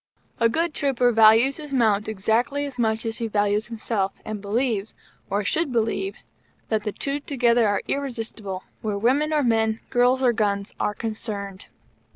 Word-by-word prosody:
A 230 -1 +4
good 330 +6 0
trooper 250 -3 +2
values 225 +4 +5
his 300 -2 -8
mount 220 -6 +2
exactly 230 +7 0
as 270 -3 -8
much 220 -1 0
as 225 0 -3
he 230 - -2
values 205 0 +1
himself, 215 -4 -2
and 215 -2 -5
believes, 220 0 -1 0.3
or 205 +1 0
should 310 +7 0
believe, 235 - -1 0.5
that 220 -2 0
the 210 - -1
two 280 +6 -3
together 240 -5 +2
are 205 -1 0
irresistible 225 -8 -4 0.2
where 210 -2 -2
women 270 +8 +2
or 300 -2 +2
men, 225 -2 +2
girl's 250 +2 +3
or 245 -2 +4
gun's, 200 -2 -1
are 210 - 0
concerned. 205 -4 -5
225 Hz, 165 wpm, -24 LUFS, 210-255 Hz, 0.5 s, values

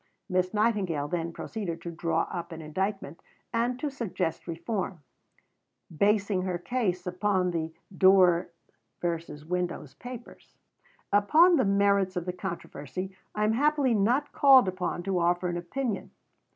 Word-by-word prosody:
Miss 185 -1 +1
Nightingale 205 -9 +1
then 170 0 -2
proceeded 175 -2 -5
to 170 - -5
draw 165 0 0
up 175 0 -5
an 165 - -7
indictment, 170 +1 -3 0.3
and 240 +2 0
to 290 +1 -2
suggest 185 - -3
reform, 180 -1 -4 0.9
basing 200 +1 +2
her 185 -1 -2
case 185 -2 -2
upon 180 0 0
the 165 -1 -2 0.2
"Doors 185 -2 +5 0.5
versus 165 -3 -4
Windows" 175 -4 -3
papers. 245 -1 -11 0.6
Upon 315 - +6
the 260 - +3
merits 200 -1 +2
of 175 -1 -2
the 180 - -3
controversy 185 0 -6 0.2
I 210 - 0
am 215 +1 +3
happily 285 0 +2
not 240 +8 +2
called 265 -6 +6
upon 180 -1 -2
to 190 -1 0
offer 175 +1 +1
an 175 - -2
opinion. 215 +5 -3
185 Hz, 140 wpm, -28 LUFS, 175-215 Hz, 0.9 s, Upon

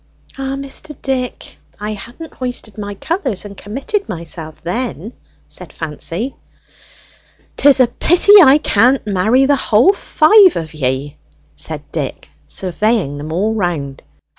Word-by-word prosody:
"Ah, 270 0 -3
Mr. 275 +1 -6
Dick, 255 -2 -3 0.2
I 210 +1 -4
hadn't 240 +10 -10
hoisted 245 -5 -6
my 205 -1 -6
colours 265 - -3
and 200 -1 -9
committed 270 - -4
myself 165 -3 -7
then!" 220 +3 -4 0.3
said - - -8
Fancy. 165 - -5 1.2
"'Tis 280 -1 +5
a 255 - +7
pity 350 - +3
I 275 0 +7
can't 255 -2 +2
marry 215 +7 +2
the 285 +1 +3
whole 260 - +4
five 380 +1 +5
of 160 -1 -5
ye!" 135 0 -2 0.4
said 75 - -5
Dick, - - -5 0.2
surveying 185 - -1
them 150 +2 -6
all 200 +7 0
round. 165 -10 -3
220 Hz, 130 wpm, -16 LUFS, 170-270 Hz, 1.2 s, a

